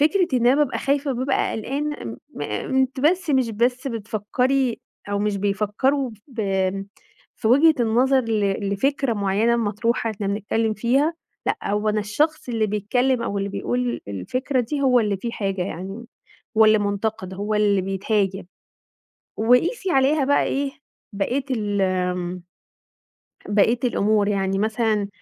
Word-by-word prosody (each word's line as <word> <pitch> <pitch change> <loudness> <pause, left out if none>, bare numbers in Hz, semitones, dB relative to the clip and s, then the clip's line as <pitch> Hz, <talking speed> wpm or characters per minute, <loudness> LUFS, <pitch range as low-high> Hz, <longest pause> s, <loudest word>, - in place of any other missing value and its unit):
فكرة 355 +5 +3
إن 240 -1 +2
أنا 255 - +6
بابقى 295 -3 +1
خايفة 280 +1 0
وبابقى 260 +2 0
قلقانة 285 +7 -3
امم 115 0 -6 0.3
آآ 105 -7 -3
أنتِ 265 0 0
بس 345 +3 +2
مش 260 -4 +2
بس 245 +4 0
بتفكري 235 +3 -1 0.3
أو 200 - 0
مش 210 -1 0
بيفكروا 210 +7 0 0.2
بآمم 195 -4 -1 0.5
في 220 - -1
وجهة 305 +6 +6
النظر 255 +4 +3
ل 205 -3 -1
لفكرة 270 +3 0
معينة 205 +4 +1
مطروحة 225 +1 0
إحنا 205 -1 -4
بنتكلم 215 +2 -1
فيها. 270 +9 +1 0.3
لأ - - +1
هو 210 +1 0
أنا 215 0 +1
الشخص 275 +9 -1
اللي 225 -2 0
بيتكلم 235 +5 0
أو 200 -3 -2
اللي 200 0 -2
بيقول 245 +4 -2
الفكرة 250 - -1
دي 280 +5 -3
هو 250 -2 +4
اللي 210 -3 0
فيه 235 +3 -4
حاجة 195 -3 -2
يعني، 195 +6 -6 0.5
هو 220 - +8
اللي 215 0 +5
منتقد، 200 -2 -2
هو 205 +2 -2
اللي 205 -2 +3
بيتهاجم. 195 0 -1 0.9
وقيسي 290 - +2
عليها 275 +1 +3
بقى 285 +1 +3
إيه 275 0 -1 0.4
بقية 245 +7 -1
ال 205 -5 -1
آمم 180 -1 -1 1.1
بقية 220 +4 +3
الأمور. 210 -3 +2
يعني 195 -1 0
مثلًا 215 -1 0
220 Hz, 145 wpm, -23 LUFS, 200-260 Hz, 1.1 s, هو